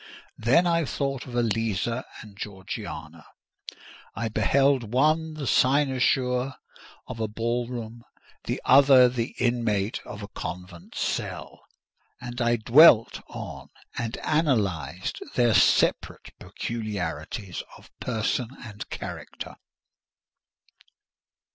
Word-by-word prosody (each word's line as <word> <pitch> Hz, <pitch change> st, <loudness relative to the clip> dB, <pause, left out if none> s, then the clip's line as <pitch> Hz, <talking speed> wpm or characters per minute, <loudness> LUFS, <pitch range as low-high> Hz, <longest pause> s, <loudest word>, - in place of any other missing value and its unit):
Then 130 Hz, +11 st, +4 dB
I 170 Hz, -1 st, +2 dB
thought 135 Hz, -1 st, -3 dB
of 120 Hz, -, -8 dB
Eliza 115 Hz, +1 st, 0 dB, 0.2 s
and 105 Hz, -2 st, -14 dB
Georgiana; 95 Hz, -5 st, -7 dB, 0.9 s
I 115 Hz, 0 st, -2 dB
beheld 130 Hz, +2 st, +2 dB
one 155 Hz, +4 st, +2 dB
the 150 Hz, -2 st, -5 dB
cynosure 130 Hz, -1 st, +2 dB, 0.5 s
of 120 Hz, -3 st, -8 dB
a 110 Hz, -, 0 dB
ball 115 Hz, +3 st, -2 dB
room, 120 Hz, -1 st, -7 dB, 0.4 s
the -, -, -2 dB
other 135 Hz, -1 st, +7 dB
the 120 Hz, -1 st, -3 dB
inmate 115 Hz, -4 st, 0 dB
of 105 Hz, -1 st, -8 dB
a -, -, -6 dB
convent 90 Hz, -3 st, -8 dB
cell; -, -, -3 dB, 0.6 s
and 120 Hz, 0 st, -6 dB
I 120 Hz, 0 st, +3 dB
dwelt 115 Hz, +1 st, +6 dB
on -, -, -8 dB, 0.3 s
and 115 Hz, -2 st, -3 dB
analysed 105 Hz, -, 0 dB
their 120 Hz, -2 st, +4 dB
separate -, -, +2 dB
peculiarities 105 Hz, -3 st, -5 dB, 0.2 s
of -, -, -19 dB
person 115 Hz, +1 st, -1 dB
and 105 Hz, -3 st, -8 dB
character. -, -, -7 dB
120 Hz, 105 wpm, -26 LUFS, 105-130 Hz, 0.9 s, other